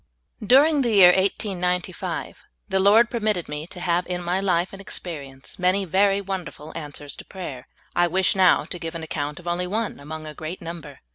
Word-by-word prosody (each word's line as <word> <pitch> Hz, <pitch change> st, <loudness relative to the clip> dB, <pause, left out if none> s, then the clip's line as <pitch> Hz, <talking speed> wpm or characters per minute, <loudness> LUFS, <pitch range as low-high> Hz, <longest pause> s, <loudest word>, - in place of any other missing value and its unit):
DURING 285 Hz, +7 st, +5 dB
the 245 Hz, -, +1 dB
year 185 Hz, -3 st, +9 dB
1895, 180 Hz, -1 st, -1 dB, 0.3 s
the 190 Hz, -, +1 dB
lyord 215 Hz, +5 st, +5 dB
permitted 215 Hz, -7 st, 0 dB
me 150 Hz, +2 st, -5 dB
to 180 Hz, -, -9 dB
have 175 Hz, 0 st, 0 dB
in 180 Hz, -1 st, -3 dB
my 175 Hz, +2 st, 0 dB
life 185 Hz, -2 st, +1 dB
and 195 Hz, -, -8 dB
experience 140 Hz, -8 st, -6 dB
many 185 Hz, +2 st, +2 dB
very 195 Hz, +3 st, +3 dB
wonder 190 Hz, -3 st, -4 dB
ful 150 Hz, +1 st, -12 dB
answers 145 Hz, -2 st, -6 dB
to -, -, -8 dB
prayer. 145 Hz, -10 st, -8 dB, 0.3 s
I 175 Hz, 0 st, +4 dB
wish 185 Hz, +2 st, +2 dB
now 185 Hz, -2 st, +5 dB
to 180 Hz, -, -6 dB
give 165 Hz, 0 st, -6 dB
an 165 Hz, -, -5 dB
account 150 Hz, 0 st, -4 dB
of 175 Hz, -, -12 dB
only 175 Hz, +1 st, -1 dB
one 215 Hz, 0 st, -2 dB
among 155 Hz, +2 st, -7 dB
a 155 Hz, -, -7 dB
great 160 Hz, +4 st, -6 dB
number. 170 Hz, -1 st, -8 dB
180 Hz, 195 wpm, -24 LUFS, 165-195 Hz, 0.3 s, year